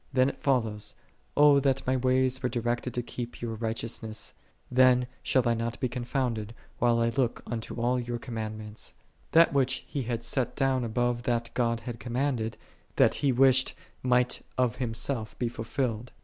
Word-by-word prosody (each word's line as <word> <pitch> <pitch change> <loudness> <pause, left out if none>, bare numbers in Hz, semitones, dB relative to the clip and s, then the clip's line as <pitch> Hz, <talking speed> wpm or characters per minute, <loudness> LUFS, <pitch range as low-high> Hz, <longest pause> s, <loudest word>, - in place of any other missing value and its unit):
Then 130 0 +4
it - - -8
follows, 110 -6 0 0.4
"O 145 -1 +7
that 135 -1 +1
my 130 - +2
ways 130 0 +2
were 125 - 0
directed 120 +1 -1
to 120 - -1
keep 120 0 -6
Thy - - -4
righteousnesses: 110 0 -3 0.4
then 125 0 +5 0.2
shall 130 -2 +2
I 120 - +4
not 115 0 -3
be 130 - +1
confounded, 120 -3 -2 0.2
whilst 115 +1 +2
I - - +7
look 120 -2 -1
unto 115 0 -4
all 125 +2 +2
Thy 120 0 -3
commandments."3 110 -2 -5 0.4
That 165 -3 +6
which 135 -1 +1
he 140 - -3
had 120 -1 -3
set 125 +1 -1
down 135 -2 +1
above 120 +1 0
that 115 -1 0
God 115 -2 0
had 115 0 -6
commanded, 120 -3 -1 0.4
that - - +5
he 140 - +3
wished 130 +1 +4 0.3
might 125 0 +2 0.2
of 125 -3 +1
himself 115 -1 -2
be 120 - 0
fulfilled. 115 0 -3
120 Hz, 165 wpm, -28 LUFS, 115-130 Hz, 0.4 s, O